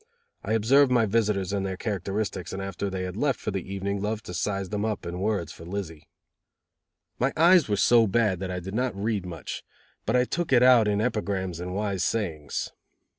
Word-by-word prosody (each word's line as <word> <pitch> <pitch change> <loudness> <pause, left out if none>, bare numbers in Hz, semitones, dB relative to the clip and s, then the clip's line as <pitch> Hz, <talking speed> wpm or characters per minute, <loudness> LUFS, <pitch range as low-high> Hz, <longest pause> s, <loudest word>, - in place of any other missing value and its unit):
I 110 - -1
observed 130 +5 +4
my 120 -3 +4
visitors 105 -3 0
and 100 -1 0
their 95 -1 -3
characteristics 100 -2 -3
and 95 - -4
after 95 +1 -3
they 95 -1 -3
had 90 0 -5
left 135 +2 0
for - - -3
the 95 -1 -5
evening 100 0 -2
loved 110 +1 -3
to 90 - -7
size 100 +1 -2
them 105 -1 -2
up 110 -2 -2
in 85 +1 -4
words 95 -5 -1
for 80 - -11
Lizzie. 85 -4 -6 1.1
My 130 +3 +2
eyes 170 -3 +6
were 105 - +2
so 115 +2 +5
bad 105 -3 +2
that 95 -1 -4
I 90 0 -3
did 95 +2 -7
not 125 -1 -1
read 100 -2 -2
much, 85 -3 -6 0.4
but 115 - +2
I 125 - +5
took 170 +3 -2
it 125 -2 +6
out 125 -4 +6
in 105 0 +1
epigrams 100 -7 -2
and 90 +1 -5
wise 100 -2 -1
sayings. 80 -10 -2
100 Hz, 205 wpm, -26 LUFS, 95-115 Hz, 1.1 s, eyes